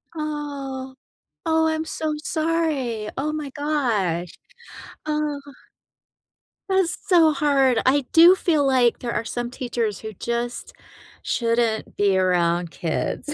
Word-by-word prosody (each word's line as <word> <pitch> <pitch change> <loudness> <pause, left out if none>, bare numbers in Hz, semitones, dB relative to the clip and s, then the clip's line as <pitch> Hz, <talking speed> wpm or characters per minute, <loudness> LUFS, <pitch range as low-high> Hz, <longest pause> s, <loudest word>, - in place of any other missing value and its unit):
Oh. 280 -4 -5 0.5
Oh, 320 0 +3
I'm 315 0 -1
so 310 -1 -3
sorry. 305 -9 -1
Oh 300 +3 -1
my 300 -2 -4
gosh. 235 - -1 0.8
Ugh. 300 -2 -1 1.3
That's 380 -3 +1
so 335 -5 +5
hard. 275 -4 +2
I 270 +1 +3
do 345 +3 +8
feel 310 -6 +1
like 250 -3 +3
there 240 -1 -4
are - - -1
some 240 +1 -4
teachers 240 -4 -3
who 220 - -7
just 235 +4 -4 0.5
shouldn't 230 -2 0
be 200 -2 +3
around 175 -2 +1
kids. 170 - -3
270 Hz, 115 wpm, -23 LUFS, 230-305 Hz, 1.3 s, do